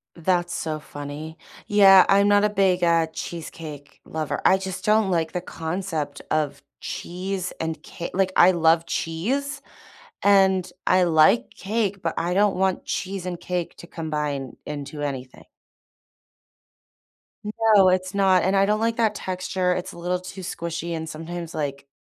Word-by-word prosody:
That's 175 Hz, +1 st, 0 dB
so 155 Hz, -1 st, -3 dB
funny. 150 Hz, +2 st, -8 dB, 0.3 s
Yeah. 195 Hz, -2 st, +7 dB
I'm 200 Hz, +1 st, +5 dB
not 205 Hz, 0 st, +4 dB
a 210 Hz, -, +3 dB
big, 190 Hz, -3 st, +2 dB
uh, 165 Hz, -1 st, +3 dB
cheesecake 155 Hz, -4 st, -8 dB
lover. 155 Hz, -1 st, -3 dB
I 190 Hz, -, +6 dB
just 190 Hz, -1 st, -6 dB
don't 215 Hz, -2 st, +3 dB
like 165 Hz, -2 st, 0 dB
the 180 Hz, -, -2 dB
concept 160 Hz, -4 st, -4 dB
of 145 Hz, -2 st, 0 dB, 0.2 s
cheese 185 Hz, +1 st, -4 dB
and 160 Hz, -1 st, -3 dB
ca 170 Hz, -, -7 dB
like, 190 Hz, 0 st, +1 dB
I 180 Hz, -, +7 dB
love 165 Hz, -1 st, +3 dB
cheese 250 Hz, -, -2 dB, 0.6 s
and 190 Hz, -2 st, +4 dB, 0.2 s
I 185 Hz, 0 st, +4 dB
like 165 Hz, +8 st, +4 dB
cake, 200 Hz, -1 st, -2 dB
but 165 Hz, -, -1 dB
I 175 Hz, +2 st, -1 dB
don't 205 Hz, 0 st, +3 dB
want 190 Hz, 0 st, 0 dB
cheese 190 Hz, -1 st, -4 dB
and 175 Hz, -1 st, -4 dB
cake 180 Hz, -2 st, -3 dB
to -, -, -11 dB
combine 150 Hz, -6 st, -4 dB
into 145 Hz, 0 st, -6 dB
anything. 135 Hz, -3 st, -5 dB, 2.3 s
No, 190 Hz, -2 st, +7 dB
it's 185 Hz, +1 st, 0 dB
not. 190 Hz, -2 st, +3 dB
And 190 Hz, +2 st, +2 dB
I 195 Hz, 0 st, +4 dB
don't 210 Hz, +1 st, +1 dB
like 230 Hz, +1 st, 0 dB
that 220 Hz, -2 st, +2 dB
texture, 185 Hz, -1 st, -1 dB
it's 180 Hz, -, -4 dB
a -, -, -12 dB
little 180 Hz, +1 st, -1 dB
too 185 Hz, +1 st, -9 dB
squishy 170 Hz, -1 st, -4 dB
and 160 Hz, 0 st, -5 dB
sometimes, 165 Hz, +2 st, -6 dB
like, 140 Hz, -2 st, -4 dB
180 Hz, 155 wpm, -24 LUFS, 160-190 Hz, 2.3 s, Yeah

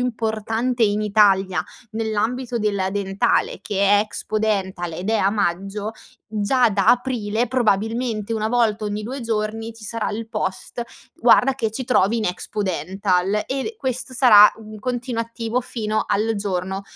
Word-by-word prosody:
importante 230 Hz, 0 st, -1 dB
in 210 Hz, -1 st, +2 dB
Italia 200 Hz, -3 st, +3 dB, 0.3 s
nell'ambito 225 Hz, +3 st, -2 dB
della 200 Hz, -3 st, 0 dB
dentale, 195 Hz, 0 st, 0 dB
che 200 Hz, -1 st, -3 dB
è 200 Hz, +1 st, +5 dB
Expodental, 205 Hz, -4 st, -2 dB
ed 180 Hz, +6 st, -3 dB
è 225 Hz, -, +3 dB
a 195 Hz, -, +2 dB
Maggio, 200 Hz, +1 st, -2 dB, 0.3 s
già 220 Hz, +3 st, +2 dB
da 200 Hz, -1 st, 0 dB
Aprile 240 Hz, -2 st, +1 dB
probabilmente 225 Hz, -1 st, 0 dB
1 220 Hz, -1 st, -1 dB
volta 225 Hz, -2 st, +1 dB
ogni 210 Hz, 0 st, -3 dB
2 260 Hz, +5 st, -5 dB
giorni 225 Hz, 0 st, -3 dB
ci 225 Hz, -, -12 dB
sarà 225 Hz, +1 st, -2 dB
il 225 Hz, +2 st, -4 dB
post: 190 Hz, +3 st, -3 dB, 0.3 s
"Guarda 245 Hz, +3 st, +4 dB
che 225 Hz, -5 st, -1 dB
ci 255 Hz, +5 st, -5 dB
trovi 230 Hz, -3 st, +2 dB
in 220 Hz, -, -1 dB
Expodental." 190 Hz, +2 st, -1 dB
E, 270 Hz, +11 st, -3 dB
questo 255 Hz, -, -3 dB
sarà 220 Hz, -5 st, +8 dB
un 215 Hz, -1 st, -10 dB
continuativo 235 Hz, 0 st, -2 dB
fino 220 Hz, -4 st, -2 dB
al 220 Hz, +2 st, 0 dB
giorno 190 Hz, -1 st, -3 dB
215 Hz, 140 wpm, -22 LUFS, 200-230 Hz, 0.3 s, sarà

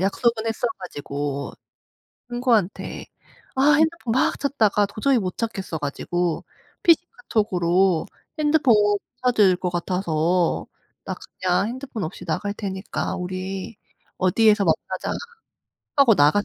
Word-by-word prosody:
약속은 220 Hz, +4 st, +1 dB
했어 225 Hz, +2 st, -1 dB
가지고 145 Hz, -5 st, -4 dB, 0.8 s
친구한테 240 Hz, -6 st, 0 dB, 0.5 s
아 270 Hz, +3 st, +5 dB
핸드폰 315 Hz, -6 st, +1 dB
막 260 Hz, -, +2 dB
찾다가 220 Hz, -7 st, +2 dB
도저히 220 Hz, +7 st, +1 dB
못 185 Hz, -5 st, -3 dB
찾겠어 200 Hz, -7 st, -3 dB
가지고 165 Hz, +4 st, -2 dB, 0.4 s
PC 335 Hz, 0 st, +5 dB
카톡으로 190 Hz, -, +1 dB, 0.3 s
"핸드폰 295 Hz, -5 st, +4 dB
못 205 Hz, -1 st, +3 dB, 0.2 s
찾을 210 Hz, -7 st, +4 dB
것 180 Hz, 0 st, -2 dB
같아서 175 Hz, -1 st, 0 dB, 0.4 s
나 -, -, -3 dB, 0.3 s
그냥 185 Hz, +2 st, +2 dB
핸드폰 250 Hz, -3 st, -5 dB
없이 180 Hz, +2 st, -6 dB
나갈 190 Hz, +5 st, -2 dB
테니까 195 Hz, -2 st, -4 dB
우리 185 Hz, +3 st, -5 dB, 0.4 s
어디에서 210 Hz, +2 st, +4 dB
만나자." 160 Hz, -2 st, -1 dB, 0.9 s
하고 275 Hz, -5 st, +6 dB
나갔어요. 155 Hz, +6 st, +4 dB
200 Hz, 270 characters per minute, -23 LUFS, 180-235 Hz, 0.9 s, 하고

